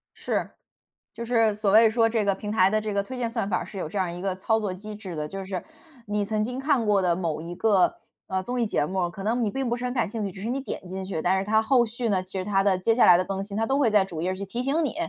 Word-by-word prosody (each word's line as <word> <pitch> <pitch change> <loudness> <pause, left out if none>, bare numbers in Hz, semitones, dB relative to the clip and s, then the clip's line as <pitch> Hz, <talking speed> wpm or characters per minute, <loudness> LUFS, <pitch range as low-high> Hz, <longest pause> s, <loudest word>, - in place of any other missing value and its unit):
是， - - -2 0.6
就 235 +1 -6
是 225 -3 +3
所 205 -2 0
谓 220 +1 +7
说 225 0 +3
这 220 -2 0
个 200 -1 +2
平 210 +1 -5
台 190 -3 +4
的 215 +1 +1
这 210 -1 -3
个 200 0 +1
推 255 +5 -7
荐 240 -2 -1
算 225 -4 -2
法 180 - +1
儿 - - -4
是 200 - -10
有 165 - -4
这 200 - -5
样 180 -3 -1
一 175 - -7
个 190 -1 -1
操 220 +4 +1
作 205 -3 -2
机 210 +3 -8
制 195 -5 -7
的。 150 0 -3
就 195 +3 -6
是 185 -2 -4 0.4
你 205 0 0
曾 215 +1 0
经 250 +3 -4
看 270 -4 +1
过 205 -2 +3
的 175 -2 +2
某 165 -4 -2
一 170 +2 -7
个， 195 -1 +3 0.3
呃， 190 0 -2
综 245 +2 -2
艺 230 - +2
节 150 - 0
目， 180 +1 -1
可 195 +3 -8
能 235 +3 +1
你 205 - -1
并 265 0 -2
不 240 - 0
是 250 - -4
很 250 - -2
感 235 -5 0
兴 225 -1 -4
趣， 195 - -4
只 190 - -10
是 225 - -3
你 270 +2 -1
点 225 -8 -6
进 190 +1 -5
去， 185 -5 -3
但 190 +2 +2
是 195 - -3
它 220 +1 +3
后 240 +1 +3
续 235 +1 -3
呢， 185 -2 +1
其 185 +1 -7
实 185 - -2
它 195 -1 +2
的 195 -2 +3
接 225 +5 +2
下 245 - +5
来 180 - +8
的 185 - +1
更 195 0 -3
新， 200 0 -8
它 225 - +1
都 270 +3 +1
会 260 -5 +4
在 210 -2 +5
主 165 -4 -6
页 185 +2 -1
去 200 +1 -5
提 235 +6 -4
醒 290 +5 +1
你。 260 - -3
205 Hz, 345 characters per minute, -26 LUFS, 190-230 Hz, 0.6 s, 来